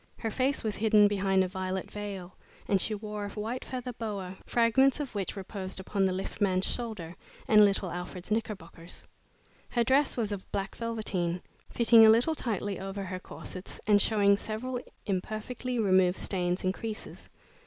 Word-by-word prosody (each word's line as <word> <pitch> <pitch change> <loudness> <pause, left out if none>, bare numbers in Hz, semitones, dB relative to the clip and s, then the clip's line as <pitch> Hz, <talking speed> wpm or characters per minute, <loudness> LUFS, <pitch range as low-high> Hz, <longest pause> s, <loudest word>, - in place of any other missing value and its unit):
Her 225 - -3
face 265 +4 0
was 215 -2 -1
hidden 215 -1 +5
behind 195 -2 +2
a - - -1
violet 185 0 -4
veil, 200 -3 -6 0.3
and 195 -2 +3
she 215 - -1
wore 210 0 -5
a - - -4
white 230 +4 -3
feather 250 -1 -5
boa, 200 -5 -5
fragments 245 +4 +4
of 285 -4 -4
which 200 -3 -3
reposed 190 -1 -5
upon 195 +1 0
the 190 - +2
lift 190 +3 -5
man's 185 -2 +3
shoulder 210 -8 -3 0.3
and 210 -1 +7
little 195 -3 +2
Alfred's 180 +2 -6
knickerbockers. 185 -6 -4 0.6
Her 240 - +2
dress 265 +4 +3
was 220 -3 0
of 195 -2 -6
black 195 0 -3
velveteen, 195 -7 -2 0.3
fitting 230 -1 +6
a 220 - +9
little 235 +8 +5
tightly 205 - -2
over 195 +1 -4
her 185 -1 -5
corsets, 185 0 -8
and 205 -2 +5
showing 200 -2 +4
several 245 +5 -4 0.3
imperfectly 215 +6 -3
removed 185 -4 +4
stains 180 -1 -1
and 185 0 +1
creases. 220 +1 -6
205 Hz, 165 wpm, -29 LUFS, 190-225 Hz, 0.6 s, a